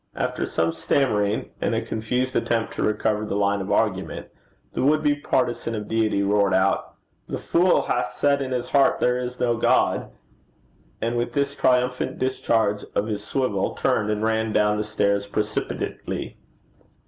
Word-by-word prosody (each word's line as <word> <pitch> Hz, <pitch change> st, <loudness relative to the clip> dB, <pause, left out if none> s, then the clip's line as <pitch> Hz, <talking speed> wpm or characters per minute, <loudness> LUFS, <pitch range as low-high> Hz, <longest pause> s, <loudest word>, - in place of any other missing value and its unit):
After -, -, -2 dB
some 80 Hz, 0 st, 0 dB
stammering, 105 Hz, +2 st, 0 dB
and -, -, 0 dB
a -, -, 0 dB
confused 125 Hz, +4 st, -2 dB
attempt 115 Hz, -1 st, 0 dB
to -, -, -4 dB
recover 105 Hz, 0 st, 0 dB
the 105 Hz, -, -3 dB
line 100 Hz, 0 st, +1 dB
of 95 Hz, -, -4 dB
argument, -, -, -1 dB, 0.4 s
the -, -, -2 dB
would 155 Hz, +3 st, +3 dB
be 145 Hz, -1 st, +4 dB
partizan 125 Hz, -5 st, -1 dB
of 105 Hz, -1 st, -5 dB
Deity 110 Hz, -3 st, +1 dB
roared 100 Hz, -1 st, +2 dB
out, 95 Hz, +1 st, +1 dB, 0.3 s
'The -, -, -3 dB
fool 180 Hz, +2 st, +3 dB
hath 125 Hz, -, -1 dB
said 140 Hz, -1 st, +2 dB
in 135 Hz, -, -3 dB
his 125 Hz, -1 st, -2 dB
heart 140 Hz, -1 st, +3 dB
there 125 Hz, 0 st, +2 dB
is 125 Hz, 0 st, -5 dB
no 120 Hz, -2 st, +1 dB
God;' -, -, +2 dB, 0.9 s
and 115 Hz, +1 st, 0 dB
with 120 Hz, -, -2 dB
this 140 Hz, -1 st, 0 dB
triumphant 125 Hz, -2 st, +1 dB
discharge 110 Hz, -5 st, 0 dB
of 100 Hz, -, +1 dB
his 105 Hz, -2 st, -3 dB
swivel, 110 Hz, -5 st, -1 dB
turned 105 Hz, 0 st, +1 dB
and 105 Hz, 0 st, -1 dB
ran 110 Hz, 0 st, +1 dB
down 105 Hz, 0 st, +2 dB
the 105 Hz, -, 0 dB
stairs 100 Hz, -1 st, 0 dB
precipitately. 105 Hz, +1 st, -3 dB
110 Hz, 165 wpm, -24 LUFS, 105-125 Hz, 0.9 s, be